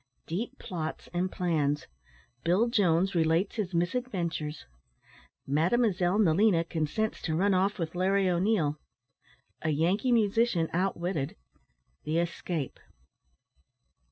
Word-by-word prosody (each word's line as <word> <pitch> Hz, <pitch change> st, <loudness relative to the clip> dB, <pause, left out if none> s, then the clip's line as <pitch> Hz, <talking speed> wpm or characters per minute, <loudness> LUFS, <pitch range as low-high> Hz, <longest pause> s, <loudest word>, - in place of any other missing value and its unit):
DEEP 230 Hz, +10 st, -4 dB
PLOTS 160 Hz, -3 st, -5 dB
AND 180 Hz, +1 st, 0 dB
PLANS 150 Hz, -5 st, 0 dB, 0.6 s
BILL 185 Hz, +8 st, +3 dB
JONES 190 Hz, -5 st, +2 dB
RELATES 165 Hz, +4 st, +1 dB
HIS 190 Hz, -5 st, -2 dB
MISADVENTURES 170 Hz, -6 st, -2 dB, 0.8 s
MADEMOISELLE 180 Hz, -, +2 dB
NELINA 190 Hz, -2 st, +4 dB
CONSENTS 170 Hz, +7 st, -2 dB
TO 160 Hz, -, -1 dB
RUN 195 Hz, +4 st, +3 dB
OFF 195 Hz, +2 st, +1 dB
WITH 165 Hz, -2 st, -3 dB
LARRY 190 Hz, +2 st, +2 dB
O'NEIL 175 Hz, -5 st, +1 dB, 0.8 s
A 160 Hz, -, -1 dB
YANKEE 175 Hz, -, +1 dB
MUSICIAN 220 Hz, -6 st, +2 dB
OUTWITTED 175 Hz, -4 st, -1 dB, 0.7 s
THE 155 Hz, +2 st, 0 dB
ESCAPE. 170 Hz, -3 st, -3 dB
175 Hz, 100 wpm, -29 LUFS, 160-200 Hz, 0.8 s, NELINA